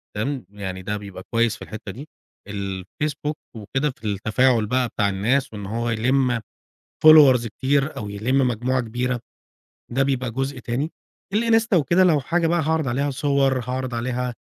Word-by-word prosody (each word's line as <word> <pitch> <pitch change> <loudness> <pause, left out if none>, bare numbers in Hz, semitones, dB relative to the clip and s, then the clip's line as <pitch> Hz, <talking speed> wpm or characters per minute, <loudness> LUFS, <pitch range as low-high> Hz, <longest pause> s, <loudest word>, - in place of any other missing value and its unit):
تمام؟ 130 +5 -2
يعني 95 -2 -6
ده 105 +3 -3
بيبقى 100 -2 -9
كويس 115 -1 +2
في - - -17
الحتّة 105 -1 -7
دي. 135 +10 -10 0.4
الFacebook 100 +10 -3 0.2
وكده 125 +7 -1
في 130 - -24
التفاعل 110 +4 +2
بقى 125 +3 +1
بتاع 100 -2 0
الناس، 115 +7 0
وإن 105 -2 -6
هو 115 +4 -2
يلم 125 +2 +1 0.7
Followers 140 -6 +8
كتير، 135 +6 0
أو 105 - -5
يلم 125 +6 +1
مجموعة 125 +3 0
كبيرة، 120 +1 -2 0.7
ده 135 +3 +2
بيبقى 130 -3 0
جزء 135 +3 -3
تاني. 130 +6 -3 0.4
الInsta 225 0 +3
وكده 170 +5 +3
لو 160 -5 +4
حاجة 170 +5 0
بقى 170 +1 +2
هاعرض 160 -1 0
عليها 140 +4 0
صور، 135 -1 +1
هاعرض 125 +1 -3
عليها، 125 +1 -2
125 Hz, 155 wpm, -23 LUFS, 110-140 Hz, 0.7 s, Followers